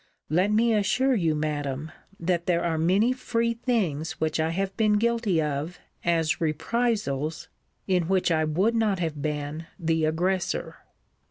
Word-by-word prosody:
Let 185 +6 +3
me 225 +2 +3
assure 235 +6 +2
you, 165 -9 +1
Madam, 150 -1 -3 0.3
that 170 0 -1
there 170 -2 +2
are 165 -2 0
many 195 +9 +3
free 235 -2 -1
things 195 - -1
which 160 0 -1
I 160 0 +1
have 190 +3 -2
been 215 -1 +3
guilty 225 -4 +1
of 150 +3 -2 0.3
as 165 -2 +1
reprisals, 160 - -1 0.4
in 180 -4 +1
which 185 -1 +2
I 160 -1 +2
would 180 +9 +1
not 220 -4 +1
have 160 -4 -3
been 150 +2 -3
the 160 -2 +1
aggressor. 175 +4 -1
170 Hz, 150 wpm, -26 LUFS, 155-210 Hz, 0.4 s, Let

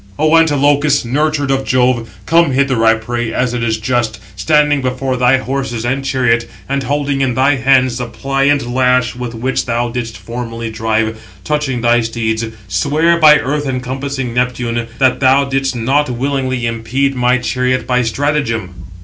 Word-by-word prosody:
"O 155 +1 +3
Antilochus, 145 -3 +3
nurtured 145 +2 0
of 135 0 0
Jove, 125 -3 +1 0.2
come 165 -3 +3
hither, 130 -3 +1
I 115 0 +5
pray, 120 +1 -3
as 125 +1 -1
it 120 - -2
is 110 -1 0
just, 110 -1 -1 0.2
standing 150 +6 +2
before 130 0 -2
thy 125 +1 +3
horses 130 -3 -3
and 135 +3 -1
chariot, 125 -3 0 0.2
and 140 +1 -1
holding 140 +1 -1
in 130 -3 0
thy 135 +2 +2
hands 130 -1 +2
the 125 - -3
pliant 135 +4 0
lash 125 -1 +1
with 120 -1 -6
which 125 +3 -2
thou 120 0 -1
didst 115 -3 -5
formerly 115 +2 -6
drive, 110 0 -1 0.2
touching 150 -5 -1
thy 120 0 +3
steeds, 115 -1 -2 0.2
swear 150 - +1
by 150 -2 +7
earth 145 +2 -2
encompassing 130 0 -4
Neptune, 120 -1 -1
that 130 -2 +2
thou 135 +1 +4
didst 135 -1 -1
not 135 +5 +1
willingly 130 0 -2
impede 115 +4 -1
my 125 0 +2
chariot 125 +1 -1
by 125 0 +1
stratagem." 115 -5 -1
125 Hz, 160 wpm, -15 LUFS, 120-140 Hz, 0.2 s, by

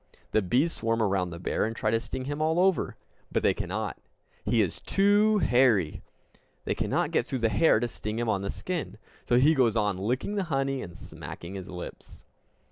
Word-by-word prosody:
The 110 - +3
bees 130 - +1
swarm 115 0 -1
around 95 -4 +1
the 85 - -7
bear 85 - -1
and 115 +1 -2
try 110 -1 0
to 115 - +2
sting 130 +2 -5
him 145 +2 -3
all 160 +2 +2
over. 190 0 +2 0.4
But - - 0
they - - +4
cannot! - - -4 0.4
He - - +1
is - - -4
too 205 +2 +3
hairy! 120 - +3 0.6
They - - 0
cannot - - 0
get - - +1
through 130 - -2
the - - +4
hair 110 +4 +4
to 120 - 0
sting 105 -1 -5
him 120 0 -1
on 105 -3 +1
the 100 - -3
skin. 145 - -4 0.3
So 120 - +5
he 145 +5 +5
goes 125 -7 +3
on 105 -3 +1
licking 125 - -1
the 195 - 0
honey 135 -3 -1
and 85 -2 -9
smacking 85 +2 -9
his 95 -1 -7
lips! 90 -1 -9
120 Hz, 205 wpm, -28 LUFS, 100-150 Hz, 0.6 s, So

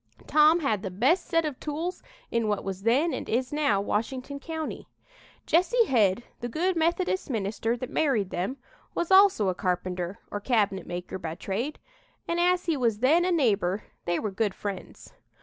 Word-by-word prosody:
Tom 310 +3 +5
had 220 -9 0
the 195 - -4
best 265 - +2
set 330 -2 +2
of 295 -4 -4
tools 320 +5 -4 0.3
in 230 -1 +1
what 210 -1 -1
was 195 -1 -5
then 270 +9 +2
and - - -5
is 250 +4 0
now 285 -10 +2
Washington 255 +7 -2
County. 320 +1 -5 0.6
"Jesse 450 +8 +3
Head, 220 - +2 0.2
the 240 - -4
good 350 +9 0
Methodist 340 +3 0
minister 225 +1 -1
that 255 - -5
married 235 -11 +1
them, 190 +10 -2 0.4
was 345 +2 -1
also 380 - +6
a 185 - +2
carpenter 180 0 -2
or 205 - -2
cabinet 205 -5 0
maker 180 +1 -5
by 165 -2 -5
trade, 215 - -3 0.5
and 340 0 0
as 360 +1 +2
he 330 -2 +1
was 235 -6 +1
then 290 +10 +4
a 365 - +1
neighbor, 210 - +1 0.2
they 175 0 0
were 210 - -2
good 200 0 -1
friends. 200 -3 -7
240 Hz, 175 wpm, -27 LUFS, 200-320 Hz, 0.6 s, also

